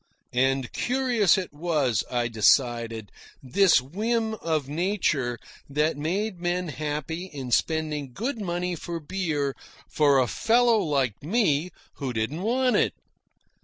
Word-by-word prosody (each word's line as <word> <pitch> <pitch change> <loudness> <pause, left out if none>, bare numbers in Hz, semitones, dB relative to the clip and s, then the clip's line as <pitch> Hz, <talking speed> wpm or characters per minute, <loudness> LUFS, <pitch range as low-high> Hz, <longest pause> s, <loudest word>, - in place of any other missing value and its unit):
And 130 0 +1
curious 245 -7 +2
it 185 -5 -4
was, 145 - 0
I 120 -1 0
decided, 115 -1 +2 0.3
this 180 +8 +4
whim 220 - -1
of 160 -9 -2
nature 150 - 0 0.3
that 150 +3 +1
made 180 +6 -2
men 175 0 -1
happy 150 +4 -4
in 140 -8 -7
spending 150 -1 0
good 230 - -3
money 180 -1 -2
for 170 +1 -5
beer 150 -5 -2 0.3
for 145 -2 +3
a 130 - +4
fellow 230 - +3
like 135 - 0
me 170 -3 +1 0.3
who 135 -4 -3
didn't 115 +9 -2
want 250 +4 +2
it. - - +2
155 Hz, 130 wpm, -26 LUFS, 135-190 Hz, 0.3 s, this